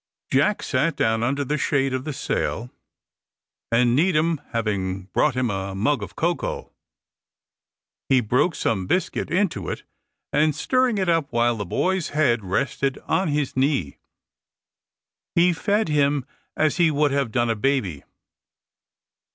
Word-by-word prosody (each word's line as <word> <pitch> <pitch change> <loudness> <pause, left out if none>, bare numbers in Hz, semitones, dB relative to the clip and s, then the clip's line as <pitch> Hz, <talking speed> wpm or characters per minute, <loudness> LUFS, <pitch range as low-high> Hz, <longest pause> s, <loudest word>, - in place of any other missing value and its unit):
Jack 150 +10 +2
sat 150 +6 0
down 110 0 +1
under 140 +4 0
the 150 +3 -1
shade 135 -2 +1
of 130 +1 -3
the 155 - -3
sail, 125 -3 -2 1.0
and 120 +1 +3
Needham 160 -1 +2
having 100 -4 -2
brought 150 -4 +2
him 125 -3 0
a 95 0 -4
mug 125 +6 +1
of 100 - -7
cocoa, 170 +1 -2 1.4
he 130 - +5
broke 125 - +1
some 95 -5 -1
biscuit 185 - -1
into 170 - 0
it, - - -5 0.5
and 150 0 +3
stirring 255 - +1
it 190 -2 0
up 165 -4 +1
while 120 0 +2
the 105 -3 -5
boy's 185 - 0
head 120 -8 +2
rested 130 +7 -1
on 190 - +1
his 145 -2 -1
knee, 130 - 0 1.4
he 175 +1 +4
fed 205 +5 0
him 145 -3 +1 0.3
as 155 +2 +2
he 170 -2 +4
would 150 -1 +2
have 140 -4 0
done 120 +1 +1
a - - 0
baby. 105 - -1
140 Hz, 145 wpm, -23 LUFS, 115-155 Hz, 1.4 s, he